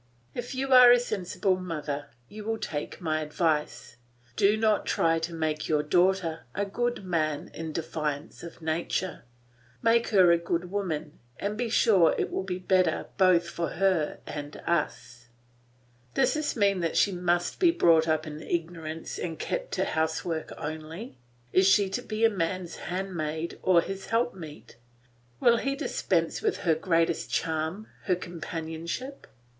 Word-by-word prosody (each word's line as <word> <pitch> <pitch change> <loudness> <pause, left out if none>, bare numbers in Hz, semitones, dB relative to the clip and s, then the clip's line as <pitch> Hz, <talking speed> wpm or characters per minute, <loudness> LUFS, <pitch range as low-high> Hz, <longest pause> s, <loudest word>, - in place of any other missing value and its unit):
If 245 +2 -5
you 265 0 0
are 250 -1 +10
a 245 - +7
sensible 185 -4 -1
mother 150 -5 -4 0.2
you 210 +1 -9
will 225 +1 -1
take 150 -2 -5
my 155 -2 0
advice. 150 -5 -1 0.4
Do 205 +1 +4
not 215 -1 +2
try 165 0 +2
to 165 +1 -4
make 155 -2 -2
your 150 -1 +2
daughter 175 0 +1
a 205 - 0
good 240 +1 -2
man 155 -4 -1
in 160 -1 -5
defiance 150 -2 -4
of 170 -1 -10
nature. 165 -1 -2 0.6
Make 230 0 +4
her 185 -5 +6
a 170 - +4
good 170 +1 -2
woman, 160 -7 -3 0.2
and 205 +1 -2
be 235 +1 -2
sure 195 -7 +4
it - - -1
will - - -1
be 185 -1 -3
better 185 -3 +1
both 180 -2 +5
for 170 -1 -3
her 180 -4 +1
and 145 0 -6
us. 125 -7 -2 0.9
Does 265 -1 +3
this 305 -1 -1
mean 200 -4 +2
that 165 -2 -1
she 200 - +4
must 175 -1 0
be 355 - +5
brought 165 - +4
up 155 0 +1
in 155 0 -7
ignorance 165 -1 -4
and 165 -2 -4
kept - - -3
to - - +1
housework 160 +1 -2
only? 160 - -7 0.3
Is 185 +1 +5
she 195 0 +4
to 245 - -2
be 225 -1 +2
man's 185 -3 -2
handmaid 170 -3 -3
or 180 -2 +5
his 195 +2 -6
help 235 +2 +1
meet? 155 -8 -11 0.6
Will 235 -1 +5
he 275 +3 -1
dispense - - -1
with 425 -3 0
her 165 - +5
greatest 165 0 +1
charm, 160 +5 -2 0.2
her 185 - +2
companionship? 170 - -6
175 Hz, 155 wpm, -28 LUFS, 160-200 Hz, 0.9 s, are